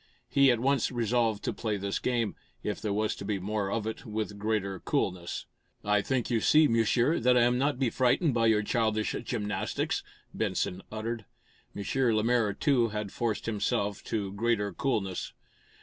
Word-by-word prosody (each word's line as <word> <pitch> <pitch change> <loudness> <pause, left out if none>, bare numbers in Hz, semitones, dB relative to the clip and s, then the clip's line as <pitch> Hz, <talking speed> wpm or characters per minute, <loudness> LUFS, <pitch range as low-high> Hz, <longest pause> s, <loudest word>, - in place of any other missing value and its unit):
He 140 -1 +5
at 120 -2 +3
once 135 0 +1
resolved 115 -2 +1
to - - -1
play 110 -3 -2
this 100 0 -2
game, 120 -4 0 0.3
if 105 - -3
there 105 - -1
was 105 +1 0
to - - -7
be 100 0 -1
more 100 +1 -2
of 110 +1 -1
it, 110 - -4
with 110 -3 -4
greater 100 -3 -1
coolness. 90 0 -2 0.4
"I 105 0 +3
think 125 +3 -1
you 115 - +3
see, 155 +7 +5
Monsieur, 120 +6 +2
that 125 +1 +4
I 120 - +5
am 120 +1 +3
not 140 0 +1
be 130 -3 +1
frightened 130 +4 +2
by 115 -1 +3
your 110 -1 +3
childish 110 -1 0
gymnastics," 105 -5 -2 0.3
Benson 90 +1 -1
uttered. 110 0 -4 0.5
M. 100 - -4 0.3
Lemaire, 115 0 +2
too, 130 -4 +2
had 105 -2 -4
forced 115 -3 -2
himself 105 -2 -1
to 100 -3 -2
greater 105 -2 0
coolness. 95 -6 -2
110 Hz, 170 wpm, -29 LUFS, 105-120 Hz, 0.5 s, He